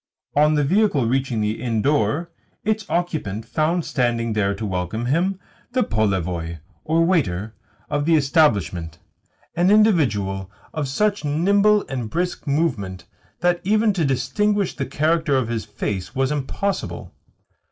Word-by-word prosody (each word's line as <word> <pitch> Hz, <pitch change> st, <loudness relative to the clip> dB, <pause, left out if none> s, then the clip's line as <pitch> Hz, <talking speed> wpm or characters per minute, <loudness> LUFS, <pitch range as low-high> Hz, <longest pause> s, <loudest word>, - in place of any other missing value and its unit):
On 150 Hz, +1 st, +4 dB
the 150 Hz, -, +2 dB
vehicle 175 Hz, -, +2 dB
reaching 125 Hz, -1 st, 0 dB
the 105 Hz, +2 st, -1 dB
inn 115 Hz, -4 st, -1 dB
door, 150 Hz, +3 st, +1 dB, 0.3 s
its 215 Hz, 0 st, -1 dB
occupant 155 Hz, -, -2 dB
found 160 Hz, +6 st, 0 dB
standing 120 Hz, -2 st, 0 dB
there 100 Hz, -2 st, +1 dB
to 110 Hz, -, -5 dB
welcome 95 Hz, +4 st, -2 dB
him 180 Hz, +8 st, +1 dB, 0.3 s
the 255 Hz, -1 st, +3 dB
polevoi, 90 Hz, -6 st, -1 dB, 0.3 s
or 165 Hz, +2 st, +2 dB
waiter, 110 Hz, -, 0 dB, 0.3 s
of 145 Hz, -1 st, -1 dB
the 165 Hz, 0 st, +4 dB
establishment 105 Hz, -, +2 dB, 0.6 s
an 175 Hz, +2 st, +3 dB
individual 110 Hz, -, +2 dB, 0.2 s
of 150 Hz, -3 st, -2 dB
such 205 Hz, +9 st, 0 dB
nimble 200 Hz, +8 st, +3 dB
and 125 Hz, -5 st, -4 dB
brisk 175 Hz, +5 st, -2 dB
movement 130 Hz, -, -1 dB, 0.4 s
that 175 Hz, -1 st, +2 dB
even 215 Hz, +2 st, +3 dB
to 175 Hz, -4 st, 0 dB
distinguish 175 Hz, +10 st, 0 dB
the -, -, -3 dB
character 155 Hz, -1 st, +1 dB
of 125 Hz, -3 st, -1 dB
his 115 Hz, -2 st, -2 dB
face 105 Hz, 0 st, -4 dB
was 135 Hz, +1 st, +1 dB
impossible. 150 Hz, +7 st, -3 dB
145 Hz, 140 wpm, -22 LUFS, 110-175 Hz, 0.6 s, On